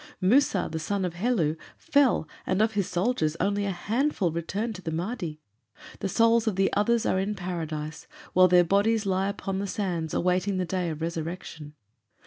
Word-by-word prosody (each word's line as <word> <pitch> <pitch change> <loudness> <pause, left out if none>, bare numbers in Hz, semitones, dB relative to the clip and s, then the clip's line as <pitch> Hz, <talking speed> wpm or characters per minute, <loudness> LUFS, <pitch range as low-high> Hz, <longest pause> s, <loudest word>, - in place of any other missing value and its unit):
Musa, 205 -1 +3
the 160 - -3
son 195 +4 -1
of 175 - -3
Helu, 175 -5 +1 0.2
fell, 275 - +2 0.2
and 185 - +1
of 220 +1 +2
his 200 -2 -1
soldiers 175 -4 0
only 205 0 0
a - - 0
handful 210 - 0
returned 195 +8 -3
to 190 - -9
the 165 - -4
Mahdi. 170 -2 -4 0.6
The 195 - -2
souls 230 +3 +3
of 215 - +1
the 195 0 +1
others 225 +3 +2
are 190 - +2
in 200 +2 -1
Paradise, 160 -4 -5 0.3
while 185 0 +7
their 180 0 +6
bodies 205 +5 +2
lie 190 0 +1
upon 195 -1 -3
the 200 - -2
sands, 175 -5 -2
awaiting 185 +2 +1
the 185 - 0
day 180 0 -1
of 160 0 -5
resurrection. 165 -2 -5
185 Hz, 180 wpm, -27 LUFS, 170-210 Hz, 0.6 s, while